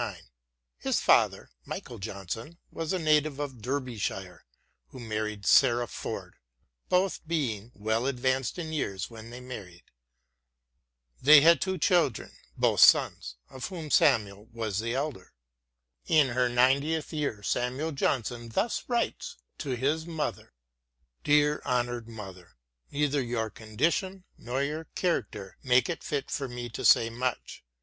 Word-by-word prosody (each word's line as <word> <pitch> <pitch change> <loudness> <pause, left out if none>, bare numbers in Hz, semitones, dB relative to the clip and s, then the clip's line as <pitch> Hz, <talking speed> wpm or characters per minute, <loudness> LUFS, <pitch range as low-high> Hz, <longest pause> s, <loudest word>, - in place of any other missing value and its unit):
His - - 0
father, - - +3
Michael 120 - -7
Johnson, 105 - -6
was 165 -1 -4
a 190 - +1
native 155 -3 +2
of 135 -5 -5
Derbyshire 120 -7 -4 0.4
who 95 - -12
married 105 -3 -4
Sarah 120 0 +5
Ford, 110 - -7 0.5
both 185 +1 +1
being 120 -9 -2
" - - -33
well 110 +4 -1
advanced 130 +1 0
in 160 -2 -5
years 100 - -3
when 115 0 -10
they 120 +1 -9
married." 100 -9 -9 1.4
They 150 +2 +9
had 165 -1 +6
two 190 0 -1
children, 170 - +1 0.3
both - - +2
sons, 60 -1 +5
of 130 -1 -6
whom 165 -5 -7
Samuel 105 -7 +3
was 110 -4 -3
the 115 +2 -2
elder. 135 -9 -4 0.7
In 155 -5 +4
her 125 0 +1
ninetieth 140 +7 +2
year 140 -9 -2
Samuel 130 - -1
Johnson 120 -4 -1
thus 210 - -1
writes 245 - -2 0.2
to 135 -4 -2
his 150 +6 -1
mother: 160 - -4 0.7
Dear 150 0 +3
honoured 120 -2 -1
mother. 95 - -10 0.3
Neither 145 -1 0
your 115 -3 -2
condition 165 - -1
nor 125 +3 -3
your 155 +3 -3
character 105 - -2
make 125 +2 +3
it 170 - -4
fit 145 -2 -3
for 140 - -2
me 120 -1 -6
to - - -6
say 115 0 +5
much. 125 +1 -4
125 Hz, 135 wpm, -28 LUFS, 115-150 Hz, 1.4 s, They